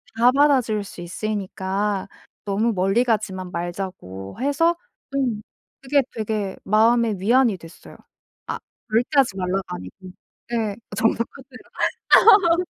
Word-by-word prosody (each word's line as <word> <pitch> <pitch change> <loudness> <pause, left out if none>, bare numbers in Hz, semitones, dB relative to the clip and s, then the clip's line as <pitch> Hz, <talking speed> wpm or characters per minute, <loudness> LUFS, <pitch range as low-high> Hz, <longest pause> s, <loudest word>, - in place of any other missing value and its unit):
다 240 +2 +5
받아줄 260 -7 +3
수 195 - -10
있으니까 195 +1 -3 0.4
너무 210 +3 +1
멀리 195 +4 +2
가지만 200 -6 -2
말자."고 170 - -6
해서 285 +6 +2 0.4
음. 245 -6 0 0.4
그게 275 +1 +2
되게 215 -3 -3
마음에 225 +2 +3
위안이 235 +1 +3
됐어요. 165 0 -14 0.5
아 - - -3 0.3
절대 225 +3 +2
하지 240 -8 +2
말라가 190 0 -1
아니고. 90 +1 -9 0.6
예. 220 -3 -1 0.2
"정도껏 225 +1 +1 1.2
해라." 335 - +4
215 Hz, 245 characters per minute, -22 LUFS, 190-235 Hz, 1.2 s, 다